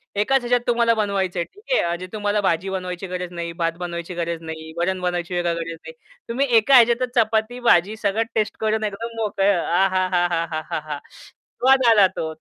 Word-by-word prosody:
एकाच 260 +7 +2
ह्याच्यात 245 0 +1
तुम्हाला 235 -1 +3
बनवायचंय. 195 -5 -1
ठीक 410 - -18
आहे. - - +3
म्हणजे 175 +2 -4
तुम्हाला 205 -1 0
भाजी 190 0 0
बनवायची 185 0 -4
गरज 180 -1 -5
नाही, 170 -1 -4
भात 165 0 +2
बनवायची 170 0 -5
गरज 170 -1 -3
नाही, 160 -1 -8
वरण 185 +2 0
बनवायची 175 0 -2
वेगळी 175 -1 0
गरज 165 0 -4
नाही. - - -7 0.4
तुम्ही 265 +4 0
एका 225 +5 +5
ह्याच्यातच 240 +1 +4
चपाती 225 +1 +1
भाजी 185 +4 +4
सगळं 215 +1 0
टेस्ट 215 -1 -1
करून 220 0 0
एकदम 225 +3 -4
मोकळं. 200 -4 +1
आहाहाहा! 175 -5 0 0.6
स्वाद 265 +1 +5
आला 205 -4 +6
तो 160 0 -3
190 Hz, 170 wpm, -22 LUFS, 170-220 Hz, 0.6 s, आला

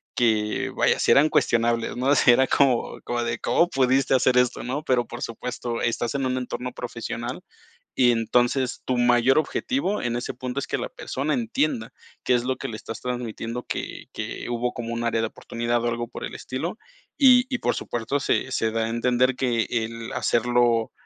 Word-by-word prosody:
que, 110 -3 +1
vaya, - - +3
si - - +3
eran 150 +3 +6
cuestionables, 115 -3 +1
¿no? 125 +2 -2
O 140 - +5
sea, 125 - +6
era 130 +2 +3
como 130 -4 +2
como 120 0 -2
de: - - -2
"¿Cómo 175 - +2
pudiste 135 -2 +2
hacer 130 0 +3
esto", 125 -1 +2
¿no? 135 +5 -3
Pero, 125 -5 +1
por 120 - -8
supuesto, 120 0 -4
estás 120 +2 -1
en 135 - 0
un 130 0 0
entorno 125 0 -4
profesional - - -5 0.5
y 125 -2 +5
entonces 120 +2 +1
tu 130 - 0
mayor 120 +3 +4
objetivo 210 - -1
en 120 -1 -1
ese 120 - -4
punto 125 +1 -4
es - - -3
que - - -1
la - - -4
persona 145 +4 -3
entienda 115 0 -1 0.3
qué - - +2
es 120 - 0
lo 130 0 0
que - - -5
le 110 - -5
estás 115 - -7
transmitiendo, 120 -1 -4
que - - -5
que - - -5
hubo 120 +1 -1
como 115 -2 -5
un 115 - -3
área 115 -1 +1
de 115 - 0
oportunidad 120 +1 -2
o 120 - +1
algo 120 0 -3
por - - -6
el - - -8
estilo. 165 - -4 0.4
Y 255 -3 +7
y, 245 - 0
por - - 0
supuesto, 120 +4 -2
se 135 - 0
se 110 -3 0
da 115 0 0
a - - -3
entender 125 +2 +2
que 120 -3 0
el 115 -1 -3
hacerlo 120 -1 +2
120 Hz, 200 wpm, -24 LUFS, 115-130 Hz, 0.5 s, Y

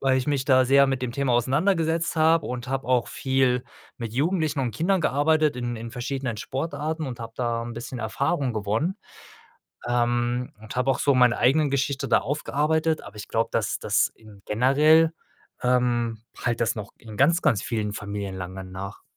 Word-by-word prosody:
weil 135 -1 +3
ich 130 - -3
mich 140 -3 0
da 130 -2 +5
sehr 140 +1 +6
mit 135 -2 -1
dem 120 -2 -2
Thema 140 -2 0
auseinandergesetzt 160 - +1
habe 160 0 +3
und 125 0 -5
habe 135 -2 -2
auch 125 -2 +2
viel 130 -2 +1 0.3
mit 115 -2 -6
Jugendlichen 155 +1 0
und 125 -3 -1
Kindern 180 - +1
gearbeitet 150 0 +2
in 120 -1 -3
in 115 +1 -7
verschiedenen 125 0 -3
Sportarten 150 +5 -3
und 120 -2 -6
hab 115 0 -8
da 120 -2 -1
'n 120 - -6
bisschen 120 +2 -6
Erfahrung 135 +4 -1
gewonnen, 110 - -1 0.9
ähm, 120 0 0
und 110 - -9
habe 125 +2 +2
auch 130 - 0
so 140 -1 +3
meine 125 -2 +4
eigenen 140 +4 +3
Geschichte 140 0 -1
da - - +5
aufgearbeitet, 155 +2 0
aber 100 +1 -12
ich 105 - -8
glaube, 115 0 0
dass - - 0
das - - +2
in 105 -3 -17
generell 150 +8 +4 0.5
ähm, 120 -2 +1 0.3
hallt 120 -1 0
das 115 - +1
noch 105 -2 -6
in 110 -2 -11
ganz, 165 +6 +4
ganz 105 - +2
vielen 105 -3 -2
Familien 100 -1 -5
lange 95 +1 -6
nach. 95 +1 -8
125 Hz, 180 wpm, -25 LUFS, 115-145 Hz, 0.9 s, sehr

